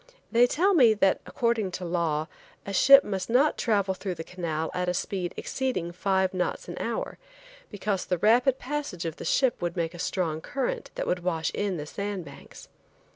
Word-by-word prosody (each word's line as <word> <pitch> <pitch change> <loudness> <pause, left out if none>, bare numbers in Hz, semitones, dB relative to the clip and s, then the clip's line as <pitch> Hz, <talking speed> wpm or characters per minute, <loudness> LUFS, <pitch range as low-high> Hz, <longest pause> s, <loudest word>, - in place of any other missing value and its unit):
They 240 +1 +5
tell 370 +10 +2
me, 245 -10 +6
that 195 -2 +2
according 235 -6 0
to 180 - -4
law, 165 -3 -1 0.4
a 200 - -5
ship 275 +7 +8
must 195 -1 -4
not 270 +6 +3
travel 200 -4 +1
through 190 -1 -5
the 165 - -6
canal 160 -3 -3
at 180 0 -1
a 180 - -1
speed 180 -1 -2
exceeding 255 -11 -2
five 190 +1 0
knots 180 -1 -2
an - - -6
hour, - - -3 0.5
because 200 -3 -3
a 180 - +3
rapid 240 +7 +4
passage 270 - -4
of 165 -1 -4
the - - -7
ship 260 -4 +2
would 175 +1 -3
make 165 0 -1
a 175 - -10
strong 165 -3 -1
current 270 +6 -3
that - - -2
would 180 - 0
wash 170 -2 -1
in 200 -3 -1
the 150 - -5
sand 200 +2 -4
banks. 140 -1 -13
190 Hz, 190 wpm, -27 LUFS, 175-235 Hz, 0.5 s, ship